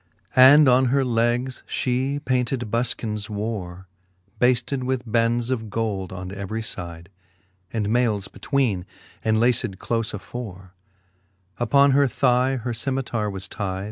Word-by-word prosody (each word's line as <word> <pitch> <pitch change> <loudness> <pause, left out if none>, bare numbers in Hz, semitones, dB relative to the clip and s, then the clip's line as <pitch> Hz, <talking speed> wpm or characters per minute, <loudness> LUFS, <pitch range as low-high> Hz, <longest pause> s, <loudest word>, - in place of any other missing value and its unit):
And 135 +3 +8
on 130 +1 +5
her 135 +2 +2
legs 120 +2 0
fhe 130 +3 -1
painted 125 -3 -1
bulkins 110 -3 -2
wore, 100 -4 -4 0.5
Bafted 125 +2 +2
with 130 -1 -1
bends 115 +2 +1
of 110 -4 -2
gold 100 -4 -2
on 95 0 -6
every 100 +3 -4
fide, 85 -3 -6 0.6
And 110 -3 -1
mailes 110 -4 +1
betweene, 120 -10 -1 0.4
and 110 0 +2
laced 115 -5 +2
clofe 115 +1 -2
afore: 95 -3 -8 0.9
Uppon 140 +4 +4
her 140 +1 +4
thigh 125 +1 +2
her 120 -1 -3
Cemitare 120 -3 -2
was 95 0 -5
tide 95 -2 -4
115 Hz, 130 wpm, -23 LUFS, 105-125 Hz, 0.9 s, And